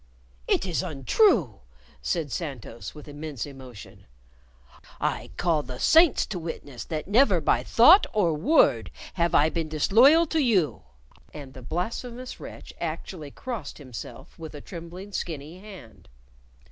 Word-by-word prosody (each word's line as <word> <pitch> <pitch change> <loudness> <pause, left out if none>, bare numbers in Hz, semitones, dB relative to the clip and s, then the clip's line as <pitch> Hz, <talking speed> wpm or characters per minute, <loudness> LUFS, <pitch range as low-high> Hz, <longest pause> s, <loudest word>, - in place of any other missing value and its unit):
"It - - +2
is 175 -4 -1
untrue," 165 - +2 0.4
said 150 - -2
Santos, 135 -7 -6
with 150 - -12
immense 145 -3 -6
emotion. 130 -6 -12 0.9
"I - - -2
call 165 -4 +1
the 125 -3 -8
saints 325 -1 +5
to 185 - -5
witness 145 -6 -7
that 155 -2 -4
never 205 -3 +4
by 150 - +2
thought 320 - +6
or 190 -7 +2
word 150 - +3 0.2
have 170 -2 +1
I 150 +2 +5
been 160 -1 -3
disloyal 240 - +5
to 320 0 0
you" 200 - +1 0.5
and 140 -3 -9
the 130 - -10
blasphemous 235 - -5
wretch - - -10
actually 160 -1 -5
crossed 225 - -6
himself 130 +2 -10
with 160 -2 -8
a - - -7
trembling, 175 +4 -9
skinny 160 -2 -5
hand. 145 - -13
165 Hz, 135 wpm, -26 LUFS, 145-205 Hz, 0.9 s, thought